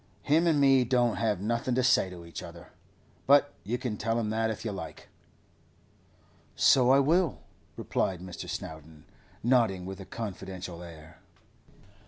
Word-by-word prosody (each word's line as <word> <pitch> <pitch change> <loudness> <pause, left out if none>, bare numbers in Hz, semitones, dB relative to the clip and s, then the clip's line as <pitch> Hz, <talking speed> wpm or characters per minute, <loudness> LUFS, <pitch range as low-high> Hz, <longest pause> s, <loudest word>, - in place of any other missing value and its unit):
Him 160 +4 +3
an' 155 -3 +3
me 135 -2 +5
don't 120 -4 +1
have 105 -2 0
nothing 120 +3 -1
to 130 - +2
say 120 -6 +3
to 85 -2 -10
each 85 - -8
other—but 145 +1 -1
you 120 +4 -2
can 120 -4 -4
tell 115 +2 -1
him 110 -2 -2
that, 110 0 0
if 110 +1 -5
you 110 - -1
like.' 95 -2 -8 1.5
'So 125 -2 +5
I 135 - +6
will,' 165 +5 +2 0.4
replied 95 -2 -1
Mr. 90 -1 -8
Snowdon, 80 0 -8 0.4
nodding 115 -7 +2
with 95 +1 -7
a 95 - -8
confidential 95 -5 -7
air. 80 -2 -12
110 Hz, 150 wpm, -29 LUFS, 90-125 Hz, 1.5 s, I